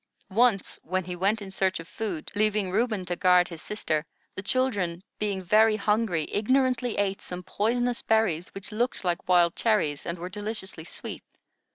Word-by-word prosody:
Once, 225 -2 +2
when 185 +3 -1
he 180 +1 -5
went 200 +4 +1
in 190 - -8
search 190 -1 +1
of 165 - -9
food, 190 -8 -4
leaving 210 -2 +1
Reuben 215 -2 0
to 175 0 -2
guard 180 0 +5
his 165 -3 -8
sister, 155 -8 -1 0.3
the - - -5
children, 195 -7 0 0.2
being 200 -3 -1
very 215 +4 +5
hungry, 210 -6 +1
ignorantly 250 +1 +1
ate 195 -1 0
some 180 0 -5
poisonous 240 +6 0
berries 210 -7 +2
which 195 +2 -7
looked 235 +2 -1
like 175 0 -1
wild 175 -2 +5
cherries, 205 -11 +1
and 170 - -2
were 175 +1 -5
deliciously 205 -3 -5
sweet. - - -6
195 Hz, 170 wpm, -27 LUFS, 180-220 Hz, 0.3 s, guard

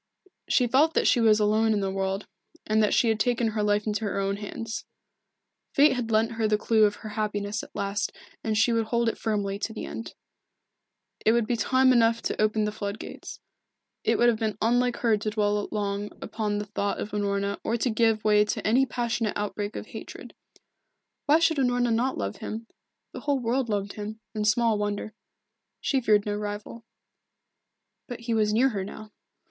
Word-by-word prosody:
She 250 - +4
felt 280 +7 +3
that - - +2
she - - +4
was 220 -1 +5
alone 215 +1 +3
in 210 - +1
the 195 -1 -1
world, 195 +1 -2 0.4
and 215 0 +2
that 210 - +2
she 235 - +3
had 220 -1 +1
taken 235 0 +1
her 215 -1 -2
life 210 0 +1
into 215 0 -1
her 200 - -1
own 195 0 -1
hands. 220 +2 -5 0.9
Fate 290 +1 +6
had 245 -3 -3
lent 225 +1 +2
her 225 -1 0
the 210 0 +2
clue 220 0 +3
of 205 - +1
her 215 - -9
happiness 210 -1 -2
at - - -14
last 200 +1 -1 0.3
and 215 -1 0
she 235 +2 +3
would 225 -1 +1
hold 235 0 +1
it - - -5
firmly 200 -3 -1
to 220 - -3
the - - -5
end. 225 - -7 1.1
It 220 - +4
would 235 -1 +2
be 240 - 0
time 260 +3 +3
enough 230 -1 +4
then - - -2
to - - -2
open 215 0 +1
the 210 - -1
flood 205 -1 -4
gates. - - -9 0.6
It - - +2
would 240 - +4
have 230 -2 +2
been 215 -2 -1
unlike 245 +2 +2
her 225 -3 +2
to 215 +1 -2
dwell 210 -1 0
long 205 0 -2
upon 210 -2 -2
the 210 - -3
thought 205 0 -2
of 210 - -4
Unorna 200 -1 -1
or 230 - 0
to 245 - 0
give 220 -1 +2
way 210 -1 +5
to 210 - -3
any 255 +5 +4
passionate 235 -2 -1
outbreak 205 0 -3
of - - -5
hatred. - - -9 0.9
Why 295 +2 +6
should 325 -1 +2
Unorna 245 -2 +2
not 250 +4 0
love 100 0 -3
him? 225 +2 -6 0.5
The - - -6
whole 285 -1 0
world 245 0 -1
loved 200 -1 -2
him, 215 +1 -6
and 210 -1 -1
small 220 0 +3
wonder. 205 +1 -3 0.7
She 270 -2 0
feared 210 -3 +3
no 205 - -1
rival. 210 +2 -6 1.2
But 245 -2 -7
he 235 0 -2
was 215 -1 +2
near 245 +5 +4
her 200 -6 -3
now. 215 +2 -9
215 Hz, 200 wpm, -26 LUFS, 210-235 Hz, 1.2 s, Fate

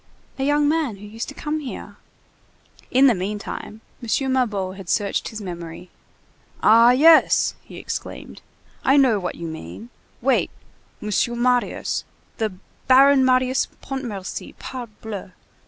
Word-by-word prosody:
"A - - 0
young 290 +1 +3
man 300 -7 0
who 200 +1 -12
used 225 +3 -6
to 285 - -10
come 305 +1 -3
here." 275 -4 -8 0.9
In 260 +2 +5
the 260 - +6
meantime, 210 +2 -5 0.2
M. 260 +3 0
Mabeuf 205 -7 0
had 190 -3 -10
searched 205 -3 0
his 220 - -7
memory. 175 -1 -8 0.7
"Ah! 230 +2 +7
yes—" 310 +6 +5
he - - -13
exclaimed. - - -7 0.4
"I 270 +2 +4
know 255 -7 +4
what 180 -2 -4
you 170 - -6
mean. 160 - -9 0.3
Wait! - - +2 0.5
Monsieur 210 +3 0
Marius—the 240 -2 -1 0.4
Baron 270 +1 +6
Marius 255 0 +2 0.2
Pontmercy, 235 -9 -6
parbleu! 220 -6 -8
235 Hz, 125 wpm, -22 LUFS, 200-265 Hz, 0.9 s, Ah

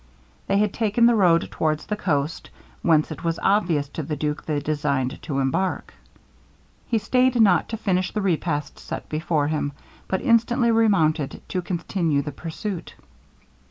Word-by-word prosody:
They 195 - +2
had 210 -1 +1
taken 225 +1 +2
the 240 - +6
road 175 -6 +3
towards 155 -1 -1
the 210 - -2
coast, 155 -6 -2 0.3
whence 160 -2 +3
it 155 - -7
was 165 -1 0
obvious 175 -8 +2
to 160 - -5
the 150 +1 -3
duke 150 +1 -3
they 150 -2 -1
designed 145 -3 -1
to 140 - -4
embark. 140 +8 -1 0.9
He 230 - +1
stayed 250 +3 +2
not 200 -5 +4
to 225 - -3
finish 185 -3 0
the 210 - -2
repast 160 -5 -1
set - - -6
before 155 -1 0
him, 150 -2 -1 0.3
but 190 - -1
instantly 235 0 +3
remounted 165 -10 +2
to 185 - -1
continue 170 -4 -1
the 150 - -5
pursuit. 170 +6 -6
170 Hz, 160 wpm, -23 LUFS, 150-210 Hz, 0.9 s, the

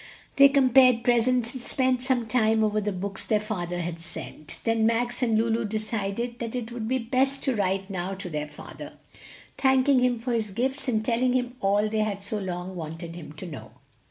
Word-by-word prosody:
They 275 0 +9
compared 255 -3 +5
presents, 240 0 +2
and 260 - -6
spent 255 0 +1
some 250 -2 +1
time 220 -1 +2
over 215 0 +1
the 205 0 -1
books 195 +1 -4
their 215 -2 +1
father 175 -5 -3
had 170 -1 -5
sent, 155 -2 -8
then 225 -1 +2
Max 240 +2 0
and 225 -3 +2
Lulu 230 +1 +1
decided 215 +2 -3
that 230 0 -4
it 240 -2 -4
would 235 -2 -4
be 260 +2 +1
best 260 +3 0
to 265 -3 +1
write 195 -1 0
now 190 0 -3
to 190 -1 -6
their 150 -3 -3
father, - - -10 0.7
thanking 265 0 +4
him 250 -1 +2
for 240 +2 -3
his 220 -2 -1
gifts 265 +7 -2
and 220 -3 0
telling 245 +1 +2
him 250 -1 -1
all 205 +2 +2
they 215 0 -1
had 205 -2 -1
so 210 +1 -3
long 185 -1 -5
wanted 165 0 -6
him 155 -4 -9
to 155 +5 -8
know. 120 -10 -9
225 Hz, 200 wpm, -26 LUFS, 195-250 Hz, 0.7 s, They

